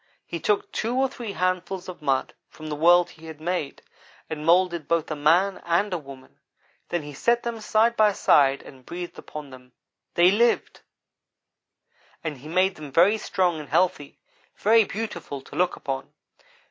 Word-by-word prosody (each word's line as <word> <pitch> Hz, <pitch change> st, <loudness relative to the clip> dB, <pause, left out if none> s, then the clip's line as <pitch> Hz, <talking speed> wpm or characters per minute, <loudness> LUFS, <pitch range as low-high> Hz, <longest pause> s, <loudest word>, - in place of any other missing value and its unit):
He 170 Hz, -, -5 dB
took 210 Hz, +5 st, 0 dB
two 230 Hz, +3 st, -2 dB
or 265 Hz, +1 st, +3 dB
three 235 Hz, -5 st, -7 dB
handfuls 185 Hz, 0 st, -2 dB
of 180 Hz, -3 st, -9 dB
mud 135 Hz, -3 st, 0 dB, 0.2 s
from 155 Hz, -1 st, -10 dB
the 150 Hz, -, -3 dB
world 175 Hz, +3 st, +5 dB
he 160 Hz, +1 st, -14 dB
had 160 Hz, -1 st, -9 dB
made, 165 Hz, -3 st, -3 dB, 0.5 s
and 150 Hz, -1 st, -4 dB
moulded 170 Hz, -1 st, +3 dB
both 165 Hz, -1 st, 0 dB
a -, -, -1 dB
man 170 Hz, +7 st, +2 dB
and 180 Hz, +4 st, +1 dB
a 180 Hz, -, -1 dB
woman. 135 Hz, -3 st, -13 dB, 0.5 s
Then 175 Hz, -3 st, -2 dB
he 145 Hz, 0 st, -9 dB
set 235 Hz, -, +1 dB
them 235 Hz, -2 st, -4 dB
side 220 Hz, +2 st, +2 dB
by 215 Hz, -2 st, +4 dB
side 140 Hz, -6 st, +3 dB
and 130 Hz, -2 st, -14 dB
breathed 175 Hz, +5 st, -7 dB
upon 150 Hz, -3 st, -9 dB
them. 125 Hz, -1 st, -14 dB, 0.4 s
They 175 Hz, +2 st, +6 dB
lived! 235 Hz, +4 st, +1 dB, 1.4 s
and 155 Hz, -5 st, -4 dB
he 145 Hz, -, -11 dB
made 185 Hz, +3 st, +1 dB
them 150 Hz, -2 st, -9 dB
very 190 Hz, +9 st, +4 dB
strong 180 Hz, -6 st, 0 dB
and 150 Hz, -, -9 dB
healthy 180 Hz, -6 st, 0 dB, 0.4 s
very 225 Hz, +1 st, +4 dB
beautiful 195 Hz, -10 st, -5 dB
to -, -, -13 dB
look 180 Hz, 0 st, +1 dB
upon. 135 Hz, -1 st, -5 dB
175 Hz, 170 wpm, -25 LUFS, 150-195 Hz, 1.4 s, They